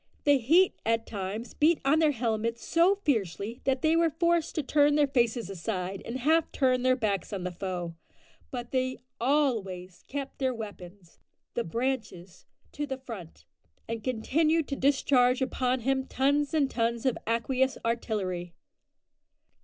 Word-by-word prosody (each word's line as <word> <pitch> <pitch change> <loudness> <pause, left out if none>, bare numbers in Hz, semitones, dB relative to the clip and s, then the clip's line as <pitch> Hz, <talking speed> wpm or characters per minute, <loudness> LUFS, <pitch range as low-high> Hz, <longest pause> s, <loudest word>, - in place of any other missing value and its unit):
The 285 -2 +5
heat 335 +10 +4
at 225 0 +1
times 205 +3 -5
beat 315 +2 +3
on 295 +3 +4
their 315 -1 +4
helmets 230 -3 -1
so 345 +4 +4
fiercely 220 - -1
that 265 -1 +1
they 315 +1 +4
were 335 0 +4
forced 340 +1 +1
to 310 - 0
turn 290 +1 +3
their 295 -1 +5
faces 240 -4 +1
aside 190 0 -4
and 235 - -4
half 315 +5 +2
turn 255 -2 +2
their 255 0 +3
backs 205 -7 -1
on 195 -3 -4
the 180 - -3
foe, 175 -1 -4 0.6
but 245 -2 -6
they 255 0 0 0.2
always 225 -10 0
kept 275 -1 -5
their 260 -2 0
weapons 195 -5 -10 0.3
the 235 - -1
"branches" 215 -5 -4 0.2
to 295 0 -4
the 265 -1 -3
front, 225 -11 -10 0.4
and 230 -1 -4
continued 305 +7 +1
to 275 - -1
discharge 260 -2 +3
upon 255 -1 0
him 265 +2 0
tons 285 +2 +1
and 280 -3 +2
tons 235 +1 -1
of 260 - +2
aqueous 260 +3 +1
artillery. 190 -7 -2
250 Hz, 155 wpm, -28 LUFS, 215-280 Hz, 0.6 s, The